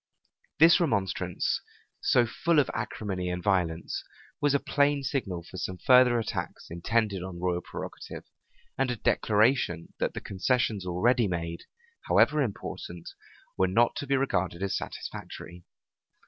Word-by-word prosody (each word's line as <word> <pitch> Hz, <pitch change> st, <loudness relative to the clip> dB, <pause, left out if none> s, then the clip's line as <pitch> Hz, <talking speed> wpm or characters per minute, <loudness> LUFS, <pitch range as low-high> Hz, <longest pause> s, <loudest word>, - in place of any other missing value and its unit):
[*] -, -, -42 dB
This 165 Hz, +4 st, +7 dB
remonstrance, 95 Hz, -, 0 dB, 0.4 s
so 120 Hz, -, +4 dB
full 165 Hz, +8 st, 0 dB
of 145 Hz, -, +3 dB
acrimony 95 Hz, -4 st, -3 dB
and 90 Hz, 0 st, -3 dB
violence, 85 Hz, -4 st, 0 dB, 0.4 s
was 145 Hz, -1 st, +3 dB
a -, -, +3 dB
plain 145 Hz, 0 st, +1 dB
signal 95 Hz, -12 st, -2 dB
for 90 Hz, -, -11 dB
some 90 Hz, +1 st, -4 dB
further 125 Hz, +3 st, +6 dB
attacks 115 Hz, -, -4 dB
intended 100 Hz, +3 st, 0 dB
on 90 Hz, -1 st, -7 dB
royal 90 Hz, 0 st, 0 dB
prerogative, -, -, -8 dB, 0.6 s
and 135 Hz, -1 st, +2 dB
a 125 Hz, -, 0 dB
declaration, 105 Hz, -6 st, +1 dB
that -, -, -1 dB
the -, -, -2 dB
concessions 100 Hz, -1 st, 0 dB
already 115 Hz, +6 st, +2 dB
made, 85 Hz, -2 st, -4 dB, 0.4 s
however 150 Hz, 0 st, +4 dB
important, 90 Hz, -7 st, -5 dB, 0.5 s
were 95 Hz, -, +4 dB
not 115 Hz, +6 st, +3 dB
to 145 Hz, -, -4 dB
be 135 Hz, 0 st, +2 dB
regarded 95 Hz, -9 st, -1 dB
as 100 Hz, -, -1 dB
satisfactory. 85 Hz, 0 st, -7 dB
100 Hz, 140 wpm, -28 LUFS, 90-130 Hz, 0.6 s, This